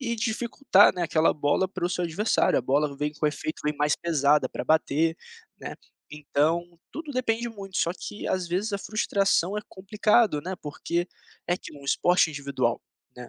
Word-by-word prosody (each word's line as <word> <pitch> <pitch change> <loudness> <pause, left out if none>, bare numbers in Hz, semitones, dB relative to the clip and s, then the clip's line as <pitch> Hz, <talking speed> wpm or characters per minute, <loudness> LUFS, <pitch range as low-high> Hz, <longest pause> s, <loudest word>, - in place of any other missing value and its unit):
e 235 -3 -2
dificultar, 225 -1 +3
né, 180 -1 -3
aquela 160 0 +2
bola 150 +5 +1
para 185 -2 -3
o - - -2
seu 180 0 -2
adversário, 185 +7 +1
a - - 0
bola 140 +3 +1
vem 150 +1 -2
com 155 - -5
efeito, 155 +1 -4
vem 150 0 0
mais 150 0 +2
pesada 150 -3 +2
pra - - -5
bater, 160 +1 +2 0.4
né, - - -7 0.4
então, 160 +3 -1
tudo 310 -2 -7
depende 235 -2 -1
muito. 195 -4 -6
Só 170 - +1
que, 210 - -7
às 185 -2 -1
vezes, 195 +5 -1
a 200 - -1
frustração 200 -2 0
é - - -1
complicado, 210 -3 +2
né, 185 +2 -4
porque 170 +4 -3 0.4
É 175 - +1
que - - -11
um 140 -1 -13
esporte 175 +3 +3
individual, 140 -1 -2 0.3
né, 125 -1 -9
175 Hz, 180 wpm, -26 LUFS, 150-205 Hz, 0.4 s, dificultar